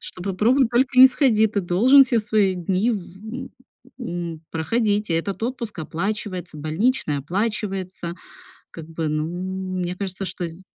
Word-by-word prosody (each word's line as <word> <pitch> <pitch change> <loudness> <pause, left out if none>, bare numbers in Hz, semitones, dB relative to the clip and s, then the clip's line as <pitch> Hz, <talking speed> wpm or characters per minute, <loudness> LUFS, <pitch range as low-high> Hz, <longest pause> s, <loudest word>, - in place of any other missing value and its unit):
что 180 - -6
попробуй 220 +8 +2
только 255 +2 +1
не 260 - +12
сходи, 245 -5 +3
ты 205 -1 -1
должен 220 +11 +6
все 240 -2 +1
свои 210 -3 +2
дни 185 +5 0
в, 190 -5 -5
м, 245 +5 -7 0.5
м, 170 -8 -5
проходить, 205 +4 0
и - - +2
этот 195 +6 -2
отпуск 235 -4 -4
оплачивается, 180 +1 -4
больничный 155 - 0
оплачивается, 190 - -3 0.6
как 165 -1 -9
бы, 165 -1 -3
ну, 155 +1 -1 0.5
мне 180 0 -2
кажется, 195 0 -4
что 180 -1 -4
з 165 +3 -11
195 Hz, 150 wpm, -22 LUFS, 175-230 Hz, 0.6 s, не